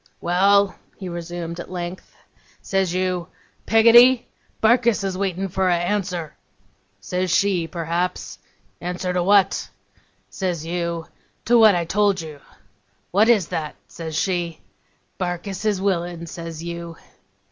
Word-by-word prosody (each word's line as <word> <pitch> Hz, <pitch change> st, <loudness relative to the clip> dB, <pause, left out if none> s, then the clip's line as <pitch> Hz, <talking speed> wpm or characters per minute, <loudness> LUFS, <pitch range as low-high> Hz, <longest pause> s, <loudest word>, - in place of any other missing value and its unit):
'Well!' 200 Hz, +3 st, +3 dB, 0.2 s
he 190 Hz, -, -7 dB
resumed 170 Hz, 0 st, -6 dB
at -, -, -7 dB
length. 180 Hz, 0 st, -7 dB, 0.5 s
'Says 190 Hz, -2 st, 0 dB
you, 180 Hz, -2 st, -1 dB, 0.4 s
"Peggotty! 235 Hz, +3 st, +6 dB, 0.3 s
Barkis 235 Hz, -1 st, +3 dB
is 190 Hz, -1 st, -2 dB
waitin' 190 Hz, 0 st, -2 dB
for 190 Hz, +1 st, 0 dB
a 175 Hz, -, +3 dB
answer." 175 Hz, -3 st, -2 dB, 0.6 s
Says 180 Hz, -, -2 dB
she, 180 Hz, -2 st, +2 dB
perhaps, 170 Hz, +2 st, -3 dB, 0.4 s
"Answer 180 Hz, +1 st, -3 dB
to 180 Hz, -, +1 dB
what?" 195 Hz, +1 st, +3 dB, 0.6 s
Says 175 Hz, -5 st, -3 dB
you, 170 Hz, -1 st, -3 dB, 0.4 s
"To 240 Hz, +1 st, +5 dB
what 215 Hz, -4 st, +7 dB
I 170 Hz, -1 st, 0 dB
told 200 Hz, +2 st, +2 dB
you." 155 Hz, -3 st, -8 dB, 0.7 s
"What 210 Hz, +5 st, +4 dB
is 205 Hz, -8 st, +3 dB
that?" 155 Hz, -2 st, -4 dB
says 160 Hz, -2 st, -7 dB
she. 175 Hz, -2 st, -1 dB, 0.6 s
"Barkis 185 Hz, +3 st, -4 dB
is 210 Hz, -3 st, +1 dB
willin'," 175 Hz, -3 st, -1 dB
says 165 Hz, -1 st, -7 dB
you. 170 Hz, -1 st, -6 dB
180 Hz, 125 wpm, -22 LUFS, 170-200 Hz, 0.7 s, what